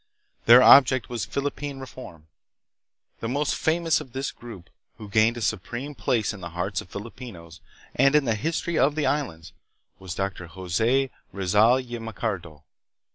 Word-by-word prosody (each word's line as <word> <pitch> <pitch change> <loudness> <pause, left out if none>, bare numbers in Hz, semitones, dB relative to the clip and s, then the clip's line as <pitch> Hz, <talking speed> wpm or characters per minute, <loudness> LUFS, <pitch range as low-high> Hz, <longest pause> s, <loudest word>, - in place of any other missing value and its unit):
Their 120 +2 +9
object 130 -6 +6
was 120 -2 -3
Philippine 140 0 -4
reform. 130 -12 -11 0.9
The 115 - -4
most 145 +3 0
famous 165 0 +1
of 125 - -12
this 135 +1 -3
group, 110 -7 -12 0.3
who 105 - -9
gained 110 +3 +2
a - - -6
supreme 120 +9 -3
place 110 -2 -1
in 100 - -10
the 85 - -6
hearts 95 +1 -2
of - - -15
Filipinos 100 -6 -10 0.3
and 135 +3 +3
in 150 -2 +4
the 115 - +1
history 165 +7 -2
of 145 +2 +3
the 155 - 0
islands, 85 - -2 0.5
was 95 -2 -7
Dr. 95 -3 -4
Jose 110 +10 0 0.2
Rizal 105 +5 +3
y 120 0 -6
Mercado. 95 -8 -5
115 Hz, 155 wpm, -25 LUFS, 95-135 Hz, 0.9 s, Their